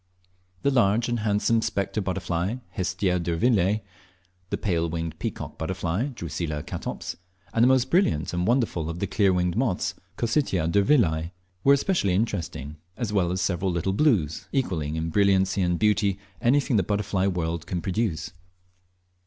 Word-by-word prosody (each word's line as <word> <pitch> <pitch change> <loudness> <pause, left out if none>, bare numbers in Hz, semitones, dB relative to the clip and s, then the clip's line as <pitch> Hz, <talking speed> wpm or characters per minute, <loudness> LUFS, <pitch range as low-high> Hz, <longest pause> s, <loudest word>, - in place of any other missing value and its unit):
The 140 - +3
large 115 -2 +3
and 120 -1 0
handsome 105 +2 +2
spectre 100 0 -1
butterfly, 90 +1 -2
Hestia 95 0 0
durvillei; 95 +4 +2 0.7
the - - -1
pale 85 -5 0
winged 80 -1 -4
peacock - - -5
butterfly, 90 - -1
Drusilla 85 - -4
catops; - - -5 0.4
and 115 - +2
the 120 - +7
most 130 0 +3
brilliant 95 - +2
and 90 +1 0
wonderful 115 - +1
of 85 - -4
the 100 - -1
clear 100 0 +2
winged 90 -1 +1
moths, 115 -6 0 0.2
Cocytia 115 - +1
durvillei, 95 - +2 0.3
were 140 - +6
especially 140 - +1
interesting, 85 - -2 0.2
as 115 -4 -3
well, 90 -4 +2
as 90 +1 -1
several 90 +1 0
little 85 +2 -1
"blues," 95 - +1
equalling 85 - -1
in 80 0 -2
brilliancy 95 0 +3
and 90 -1 +1
beauty 105 -2 +2 0.2
anything 130 -1 +3
the - - +4
butterfly 100 0 0
world 85 -3 -2
can 90 - -2
produce. 95 -1 -2
95 Hz, 150 wpm, -26 LUFS, 85-110 Hz, 0.7 s, the